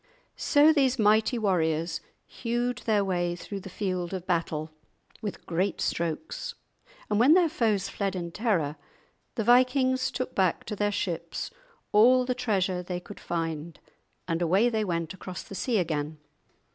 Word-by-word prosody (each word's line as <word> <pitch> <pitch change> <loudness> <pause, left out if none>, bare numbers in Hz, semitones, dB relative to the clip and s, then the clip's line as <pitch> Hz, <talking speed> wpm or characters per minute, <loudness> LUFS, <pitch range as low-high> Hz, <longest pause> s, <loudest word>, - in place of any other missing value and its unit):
So 300 +1 +5
these 265 -4 +2
mighty 215 +2 +3
warriors 165 -5 0 0.2
hewed 240 +1 -2
their 210 -3 +3
way 175 -2 0
through 200 +3 -6
the 195 - -9
field 185 -2 -2
of 185 -1 -6
battle 160 -3 -1 0.5
with 210 -3 -5
great 180 +3 -1
strokes, 170 - -2 0.5
and 210 - +1
when 275 +8 +7
their 360 -2 +5
foes 220 - 0
fled 195 -2 -2
in 170 -2 -4
terror, 170 -9 0 0.6
the 225 - 0
vikings 255 +2 +4
took 255 0 -4
back 185 -3 +1
to 210 - -5
their 205 0 +1
ships 170 - -3 0.4
all 250 +4 +6
the 250 - 0
treasure 195 -7 0
they 180 0 -4
could 180 - -11
find, 165 -1 -4 0.5
and 165 0 -1
away 190 +8 +3
they 220 -2 0
went 170 -4 -2
across 185 -1 -7
the - - -11
sea 230 +4 0
again. 155 -4 -1
195 Hz, 155 wpm, -28 LUFS, 170-240 Hz, 0.6 s, when